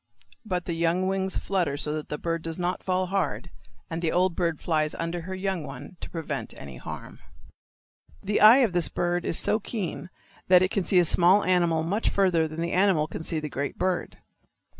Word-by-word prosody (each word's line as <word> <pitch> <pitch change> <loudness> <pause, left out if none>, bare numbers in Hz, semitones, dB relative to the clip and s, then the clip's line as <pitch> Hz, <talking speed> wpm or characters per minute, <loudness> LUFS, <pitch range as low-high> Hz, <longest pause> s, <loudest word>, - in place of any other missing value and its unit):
But 180 -5 -3
the 170 - -2
young 170 +2 +1
wings 190 0 -1
flutter 175 -8 -1
so 150 0 -3
that 155 -1 -5
the 150 - -3
bird 165 0 -2
does 165 0 -4
not 180 0 -2
fall 185 0 0
hard, 180 -2 -2 0.4
and 165 0 -4
the 165 -2 0
old 180 0 +1
bird 170 -4 -1
flies 155 -2 0
under 170 +1 -3
her 185 +3 -6
young 190 -3 -2
one 145 +5 -9
to - - -8
prevent 165 -3 -5
any 65 -3 -9
harm. - - -9 1.0
The 205 +1 0
eye 235 +5 +8
of 200 - -4
this 175 -1 +2
bird 175 0 -1
is - - +2
so 215 - +2
keen 200 -5 -5 0.4
that 180 0 +6
it 185 - 0
can 195 - -1
see 190 - +3
a 175 - +6
small 180 +5 +5
animal 170 -3 +2
much 200 +7 0
farther 180 -5 +2
than 155 +1 -6
the 170 - -2
animal 185 -5 +3
can 160 - -7
see 160 -1 -1
the 155 - -4
great 140 0 -4
bird. 185 -1 -2
175 Hz, 205 wpm, -26 LUFS, 165-185 Hz, 1.0 s, eye